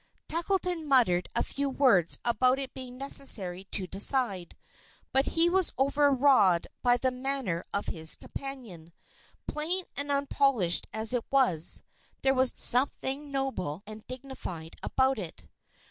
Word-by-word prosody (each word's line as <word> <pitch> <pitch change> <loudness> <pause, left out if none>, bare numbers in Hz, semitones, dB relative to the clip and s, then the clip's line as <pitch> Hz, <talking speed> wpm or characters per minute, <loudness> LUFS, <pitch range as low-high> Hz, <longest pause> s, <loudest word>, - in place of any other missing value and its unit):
Tackleton 345 -1 -2
muttered 225 -11 +2
a - - +1
few 280 0 -3
words 245 - +2
about 255 +2 +2
its 270 -1 -7
being 255 -1 -9
necessary 195 -9 +3
to 195 -1 -6
decide, 195 -2 +1 0.6
but 270 +1 +2
he 335 +1 +4
was 370 0 +1
overawed 270 -9 +2 0.2
by 245 0 +3
the 260 +1 -1
manner 255 -9 -3
of 200 - -2
his 160 -2 +3
companion. 220 -13 -10 0.5
Plain 345 +5 -3
and 285 +1 -5
unpolished 275 -9 +2
as 220 +2 -2
it 245 -2 -1
was, 245 - +4 0.4
there 270 0 +3
was 260 -1 +4
something 270 +3 +1
noble 205 - -4
and 215 +1 -11
dignified 245 -11 -8
about 265 -2 0
it. 160 - -10
255 Hz, 130 wpm, -28 LUFS, 195-275 Hz, 0.6 s, he